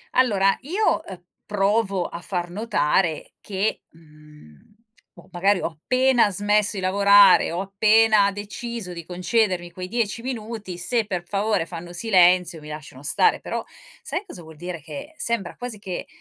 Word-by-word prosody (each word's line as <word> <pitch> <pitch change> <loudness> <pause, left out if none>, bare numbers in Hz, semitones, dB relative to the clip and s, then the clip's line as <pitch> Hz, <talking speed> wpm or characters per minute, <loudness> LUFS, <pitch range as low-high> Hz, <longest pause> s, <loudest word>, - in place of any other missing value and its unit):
Allora, 200 -6 +3
io, 370 +11 0
ehm, 185 -2 -10 0.2
provo 200 -2 0
a 170 - -6
far 175 -1 -3
notare 175 -5 0
che, 200 +1 -2
mhmm 150 - -18 0.5
o - - -17
magari 190 +3 +2
ho - - -1
appena 245 - +2
smesso 205 +2 +1
i 195 - -3
lavorare, 200 0 +5
ho 175 +3 -2
appena 210 +1 +4
deciso 205 -1 -6
di 170 -2 -8
concedermi 180 0 0
quei 180 +1 -7
10 230 +1 -2
minuti, 220 -6 -5
se 230 +4 0
per 180 -4 -3
favore 200 -3 0
fanno 175 0 -8
silenzio, 180 -4 +3
mi 150 0 -11
lasciano 150 -3 -9
stare. 430 - +2
Però - - -4 0.4
sai 410 - -4
cosa 270 - -10
vuol 160 -1 -13
dire 175 0 -7
che 280 - -9
sembra 215 -7 -2
quasi 245 -3 -6
che 190 -3 -6
195 Hz, 150 wpm, -23 LUFS, 175-220 Hz, 0.5 s, lavorare